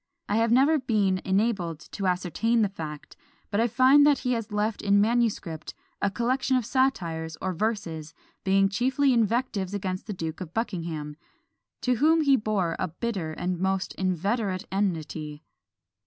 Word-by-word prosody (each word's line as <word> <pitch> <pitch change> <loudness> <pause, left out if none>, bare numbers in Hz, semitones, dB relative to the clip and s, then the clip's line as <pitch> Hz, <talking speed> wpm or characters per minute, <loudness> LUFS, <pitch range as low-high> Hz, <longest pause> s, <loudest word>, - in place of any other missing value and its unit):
I 205 - +1
have 230 0 +2
never 280 +6 +5
been 205 -7 +1
enabled 190 -5 0
to 195 - -2
ascertain 185 +6 +1
the 205 - +1
fact; 155 -6 -8 0.4
but 205 - +1
I 230 - +3
find 260 +5 +5
that 290 -1 +5
he 250 - -2
has 230 -3 -2
left 210 +1 -1
in 200 0 +3
manuscript 210 -7 0 0.3
a 200 - +2
collection 255 +5 +1
of 245 - -1
satires, 170 - 0
or 185 0 -2
Verses, 165 -6 -3 0.3
being 195 0 +4
chiefly 260 +7 +2
invectives 225 -4 0
against 185 -1 -4
the 210 - -3
Duke 165 -1 -5
of 170 -2 -8
Buckingham, 165 -9 -3 0.6
to 250 -1 +1
whom 320 +5 +4
he 280 -3 +5
bore 210 -7 0
a - - 0
bitter 175 -2 -4
and 180 +2 -3
most 190 0 -1
inveterate 190 +2 -1
enmity. 160 -6 -2
200 Hz, 155 wpm, -26 LUFS, 175-235 Hz, 0.6 s, never